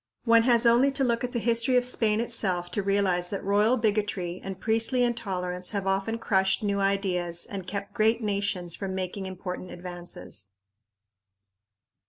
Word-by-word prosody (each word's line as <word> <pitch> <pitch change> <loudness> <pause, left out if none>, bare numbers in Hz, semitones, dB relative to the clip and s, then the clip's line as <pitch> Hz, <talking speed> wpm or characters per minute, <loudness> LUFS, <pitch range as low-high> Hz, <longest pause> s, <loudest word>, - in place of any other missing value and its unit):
One 230 -1 +5
has 235 0 +5
only 240 +4 +5
to 275 0 0
look 235 -2 0
at 250 - -2
the 240 - -2
history 235 +2 +2
of 245 - +3
Spain 220 -3 +2
itself 185 -7 0
to 205 - -1
realize 190 -3 +1
that 200 - -4
royal 210 +5 +3
bigotry 205 -5 -1
and 190 -1 -6
priestly 225 +4 +2
intolerance 180 -6 -2
have 195 - -3
often 195 +4 0
crushed 195 -1 +1
new 200 -1 0
ideas 185 -3 -1
and 190 -3 -7
kept 200 +1 -5
great 225 0 +2
nations 200 -5 -2
from 190 -1 -4
making 190 +1 -4
important 185 -1 -6
advances. 175 - -9
200 Hz, 160 wpm, -27 LUFS, 185-230 Hz, -, One